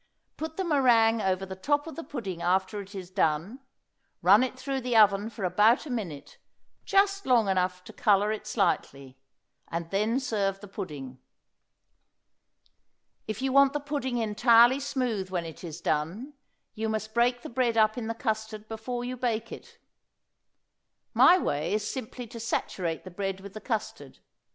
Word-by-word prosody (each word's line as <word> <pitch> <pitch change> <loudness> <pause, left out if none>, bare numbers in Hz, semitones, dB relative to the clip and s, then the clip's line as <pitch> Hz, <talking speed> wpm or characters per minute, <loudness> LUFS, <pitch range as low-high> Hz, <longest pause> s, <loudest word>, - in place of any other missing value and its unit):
Put 320 0 -6
the 380 - 0
meringue 240 -8 +4
over 190 -1 0
the 190 0 -7
top 290 +9 0
of 325 - -8
the 330 - -6
pudding 195 - -6
after 190 +3 0
it 200 +1 -12
is 185 -2 -7
done; 185 - 0 0.6
run 200 +5 +7
it 255 0 -2
through 270 0 -3
the 245 -2 +1
oven 205 0 +5
for 220 -3 -8
about 210 - +3
a 290 - -6
minute, 180 -12 -6 0.5
just 395 -2 +2
long 240 -5 +4
enough 180 -1 0
to - - -12
color 205 0 +3
it 215 - -5
slightly, 140 - -1 0.5
and 170 0 -5
then 215 +6 +1
serve 205 -7 -1
the 205 - -11
pudding. 145 -10 -7 2.1
If 215 +4 -4
you 265 -1 0
want 275 0 +6
the 295 - -1
pudding 280 -4 -3
entirely 235 +3 +5
smooth 245 -9 -2
when 175 -2 -2
it 165 +2 -10
is 170 -1 -7
done, 170 - -2 0.4
you 220 0 -3
must 220 0 -3
break 240 +1 +2
the - - -6
bread 240 -2 0
up 215 0 +4
in 235 -3 -4
the 230 - -3
custard 220 -3 -3
before 240 +2 -5
you 250 +1 -4
bake 230 -2 -2
it. - - -11 1.4
My 360 - +7
way 150 - -1
is 210 0 -2
simply 250 -1 -6
to 230 +1 -10
saturate 185 -7 -2
the 185 - -10
bread 195 +1 -3
with 195 0 -11
the 215 - -8
custard. 220 -4 -4
220 Hz, 170 wpm, -28 LUFS, 190-250 Hz, 2.1 s, run